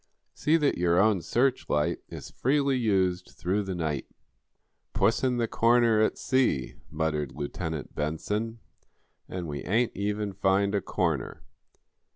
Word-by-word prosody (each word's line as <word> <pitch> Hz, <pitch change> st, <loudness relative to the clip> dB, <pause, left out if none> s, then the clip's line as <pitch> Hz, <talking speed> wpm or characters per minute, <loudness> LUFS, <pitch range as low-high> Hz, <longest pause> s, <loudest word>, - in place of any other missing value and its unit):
See 155 Hz, +2 st, +2 dB
that 145 Hz, -, +1 dB
your 85 Hz, 0 st, +3 dB
own 105 Hz, -2 st, +3 dB
search 125 Hz, +7 st, 0 dB
light 75 Hz, 0 st, +1 dB
is -, -, -8 dB
freely 140 Hz, +1 st, +1 dB
used 95 Hz, -7 st, 0 dB
through 95 Hz, +4 st, 0 dB
the 95 Hz, -2 st, -4 dB
night." 80 Hz, -5 st, -2 dB, 0.9 s
"'Puss 115 Hz, -, +2 dB
in 125 Hz, -2 st, +2 dB
the 115 Hz, -1 st, +1 dB
Corner,' 115 Hz, -1 st, +3 dB
at 110 Hz, -, +1 dB
sea," 130 Hz, -, +1 dB, 0.2 s
muttered 75 Hz, -3 st, -2 dB
Lieutenant 80 Hz, +1 st, -4 dB
Benson. 105 Hz, +10 st, -2 dB, 0.7 s
"And 90 Hz, -2 st, -4 dB
we 70 Hz, -2 st, -5 dB
ain't 115 Hz, +5 st, +1 dB
even 105 Hz, 0 st, -2 dB
find 100 Hz, +1 st, +2 dB
a 100 Hz, -, +1 dB
corner." 80 Hz, -10 st, -2 dB
100 Hz, 140 wpm, -28 LUFS, 80-115 Hz, 0.9 s, your